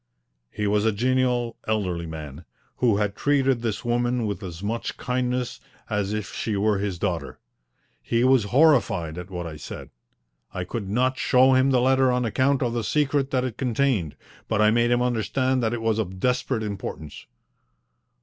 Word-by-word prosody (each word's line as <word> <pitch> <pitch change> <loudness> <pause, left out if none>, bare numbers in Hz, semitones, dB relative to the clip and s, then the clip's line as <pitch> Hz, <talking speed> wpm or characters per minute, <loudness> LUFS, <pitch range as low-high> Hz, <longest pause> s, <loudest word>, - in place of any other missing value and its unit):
He 105 - -3
was 105 0 +2
a 110 - +3
genial, 125 +1 0
elderly 90 -6 -1
man, 80 -1 -8 0.3
who 115 -5 +3
had 105 -1 -1
treated 135 -4 +1
this 115 -1 -3
woman 120 0 0
with 100 -3 -3
as 90 -1 -7
much 115 +3 -3
kindness 125 0 -2 0.3
as 105 -1 0
if 105 -2 -4
she 110 -3 -2
were 105 0 +1
his 100 -3 -2
daughter. 85 -5 -3 0.6
He 115 0 0
was 130 -4 +4
horrified 105 - +3
at 90 +1 -8
what 90 -2 -5
I 80 -2 -7
said. 75 - -9 0.6
I 90 - -2
could 100 +2 -5
not 130 +5 +1
show 130 +1 +4
him 130 +1 +4
the 130 -2 +3
letter 130 0 +3
on 125 0 0
account 130 +4 +1
of 120 -1 -1
the 120 -1 -1
secret 140 +3 +1
that 130 -2 0
it 125 -4 -4
contained, 120 - 0 0.3
but - - 0
I 105 0 +5
made 120 +1 +2
him 120 0 +2
understand 130 +2 0
that 110 -2 0
it 120 -1 -3
was 110 -1 +1
of 95 -3 -4
desperate 125 0 0
importance. 95 -7 -6
115 Hz, 180 wpm, -24 LUFS, 100-125 Hz, 0.6 s, I